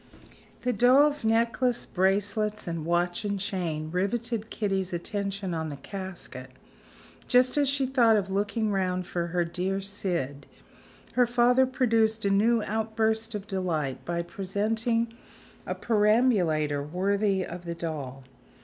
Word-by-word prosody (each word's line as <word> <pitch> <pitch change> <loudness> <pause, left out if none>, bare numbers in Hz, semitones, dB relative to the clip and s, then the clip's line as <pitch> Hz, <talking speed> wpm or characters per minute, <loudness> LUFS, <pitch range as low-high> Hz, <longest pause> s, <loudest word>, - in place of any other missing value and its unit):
The 250 - +1
doll's 280 +4 +4
necklace, 230 +2 +1
bracelets, 205 +3 0
and 165 -2 -3
watch 175 +2 0
and 200 -1 -2
chain, 165 -6 -3
riveted 220 +4 -1
Kitty's 195 -3 -2
attention 195 +1 -3
on 160 -1 -2
the 145 - -5
casket. 175 -7 -8 0.8
Just 250 0 +4
as 290 -2 +3
she 275 -1 +1
thought 240 -4 +4
of 195 -2 -2
looking 210 +2 0
round 185 -2 0
for 170 -1 -2
her 175 0 0
dear 185 +3 -2
Syd, 175 -8 -3 0.7
her 245 -1 +4
father 245 +2 +4
produced 225 -4 +1
a 200 - +2
new 220 +3 +3
outburst 220 +1 -1
of 205 -1 -5
delight 170 - -2
by 170 0 -2
presenting 220 +5 -1 0.5
a - - -2
perambulator 205 - +2
worthy 190 +5 0
of 175 +1 -8
the 170 0 -4
doll. 145 -6 -5
200 Hz, 130 wpm, -27 LUFS, 175-225 Hz, 0.8 s, doll's